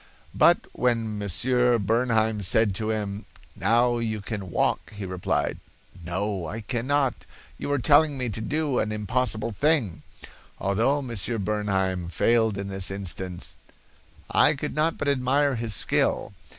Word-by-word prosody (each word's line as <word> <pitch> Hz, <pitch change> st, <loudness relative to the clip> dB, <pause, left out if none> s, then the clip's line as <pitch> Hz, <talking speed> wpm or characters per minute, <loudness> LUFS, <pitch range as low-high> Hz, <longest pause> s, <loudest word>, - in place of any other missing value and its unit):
But -, -, +4 dB
when 115 Hz, -4 st, 0 dB
Monsieur 125 Hz, +5 st, +2 dB
Bernheim 110 Hz, 0 st, +1 dB
said 110 Hz, +1 st, +3 dB
to 110 Hz, +3 st, -2 dB
him, 105 Hz, -1 st, -3 dB, 0.3 s
'Now 120 Hz, +4 st, +2 dB
you 110 Hz, -2 st, -2 dB
can 100 Hz, -2 st, -6 dB
walk, 80 Hz, -, 0 dB
he 100 Hz, -1 st, -6 dB
replied, 90 Hz, -1 st, -2 dB, 0.4 s
'No, 95 Hz, +1 st, -2 dB
I 110 Hz, +8 st, -5 dB
cannot; 130 Hz, +4 st, -1 dB, 0.3 s
you -, -, -3 dB
are 145 Hz, -, +2 dB
telling 145 Hz, +3 st, +4 dB
me 125 Hz, -1 st, -2 dB
to 110 Hz, +1 st, -4 dB
do 150 Hz, +2 st, 0 dB
an 105 Hz, -, -1 dB
impossible 110 Hz, +2 st, 0 dB
thing.' 125 Hz, -, +1 dB, 0.6 s
Although 115 Hz, +9 st, +1 dB
Monsieur 115 Hz, -1 st, -2 dB
Bernheim 95 Hz, -4 st, -1 dB
failed 110 Hz, +5 st, +2 dB
in 100 Hz, 0 st, -4 dB
this 95 Hz, -1 st, -1 dB
instance, 95 Hz, -2 st, -5 dB, 0.7 s
I -, -, +4 dB
could -, -, -4 dB
not 155 Hz, +2 st, 0 dB
but -, -, -3 dB
admire 140 Hz, +1 st, +2 dB
his 115 Hz, -3 st, -2 dB
skill. -, -, 0 dB
110 Hz, 140 wpm, -25 LUFS, 100-125 Hz, 0.7 s, But